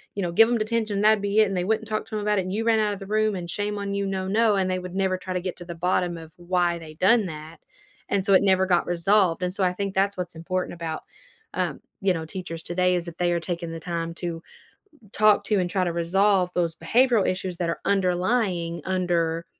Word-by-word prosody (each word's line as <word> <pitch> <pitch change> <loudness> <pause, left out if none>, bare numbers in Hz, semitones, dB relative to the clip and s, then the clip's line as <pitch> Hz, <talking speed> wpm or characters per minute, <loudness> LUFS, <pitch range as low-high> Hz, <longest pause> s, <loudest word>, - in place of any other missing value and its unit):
you 200 - -2
know, 175 - -1
give 225 +6 +6
'em 240 - +2
detention 215 -1 -1
and - - 0
that'd 215 -1 +5
be 205 +1 +1
it, 215 - +6
and 195 - -2
they 180 - 0
wouldn't 220 +1 0
talk 215 0 -2
to 225 - -7
him 210 - -1
about 210 0 +1
it. - - 0
And, 185 +1 -4
"You 220 +2 -1
ran 225 -1 +3
out 210 -1 +1
of 200 - -7
the 195 - -9
room" 215 0 +1
and, 175 -2 -6
"Shame 205 +3 -2
on 200 0 -3
you, 200 0 -1
no 190 -1 -2
no." 215 +1 +3
And 190 -1 +1
they 185 - -1
would 180 0 -8
never 190 -1 +1
try 185 0 -6
to 180 - -1
get 185 0 -5
to 175 - -10
the 170 -1 -7
bottom 175 0 0
of 160 -1 -11
why 175 -1 0
they 160 -2 -10
done 210 +6 +4
that, 155 -1 -8 0.5
and 195 -1 0
so 200 - +3
it 190 - +6
never 190 -1 +4
got 175 -2 +2
resolved. 175 0 +2
And 180 0 -1
so 195 - -1
I 180 - +1
think 195 +1 -3
that's 195 +1 +2
what's 180 -1 -5
important 180 +3 -3
about, 165 -2 -5 0.5
um, - - -2 0.2
you 195 -1 +3
know, 165 -2 -4
teachers 165 -1 -6
today. 180 +1 +1
Is 175 -1 -2
that 170 -1 -9
they 175 -1 +1
are 170 - 0
taking 170 -1 -4
the 165 - -6
time 165 0 -4
to 170 -2 -5 0.7
talk 215 -1 +4
to 210 -3 +1
and 175 -1 -1
try 185 -1 +1
to 175 - -1
resolve 185 +2 +2
those 170 -2 +1
behavioral 240 0 +3
issues 185 -1 -3
that 175 - -1
are 170 - -3
underlying 185 -2 0
under, 170 -3 0
185 Hz, 260 wpm, -25 LUFS, 175-200 Hz, 0.7 s, give